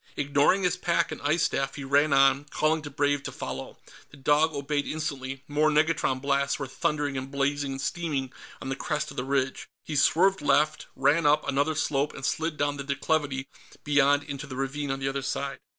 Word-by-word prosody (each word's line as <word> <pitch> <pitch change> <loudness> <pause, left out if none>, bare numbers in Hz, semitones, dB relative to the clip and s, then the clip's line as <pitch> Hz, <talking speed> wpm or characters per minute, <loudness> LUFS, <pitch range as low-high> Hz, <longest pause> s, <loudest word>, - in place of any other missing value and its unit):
Ignoring 145 +7 +3
his 180 0 +1
pack 170 -1 0
and - - -6
ice 150 +3 +1
staff, 135 0 -1
he 145 - -6
ran 140 +2 +3
on, 135 +1 +4
calling 155 +1 0
to 150 - -7
Brave 145 0 +1
to - - -6
follow. - - -6 0.3
The 145 - -15
dog 150 +3 +3
obeyed 145 0 -2
instantly; 135 -4 -4
more 150 +1 +2
negatron 155 -3 +2
blasts 140 +1 0
were 140 - -4
thundering 145 +1 -1
and 130 +1 -7
blazing 140 0 -1
and 135 - -5
steaming 145 -6 -2 0.3
on 135 - -6
the 135 - -1
crest 150 +2 -3
of - - -12
the 125 - -1
ridge. 135 0 -1 0.2
He 155 - -4
swerved 185 +6 +3
left, 150 +1 +2
ran 145 +4 +3
up 150 +1 +3
another 145 +3 +1
slope, 145 -1 0
and 135 - -5
slid 160 +1 -1
down 145 0 0
the 140 - -4
declivity 140 -1 -1 0.4
beyond 145 -1 +3
into 145 0 -6
the 130 - -7
ravine 135 +2 -3
on 135 - -1
the 135 0 -3
other 135 0 -2
side. 135 +1 -3
145 Hz, 200 wpm, -27 LUFS, 135-150 Hz, 0.4 s, on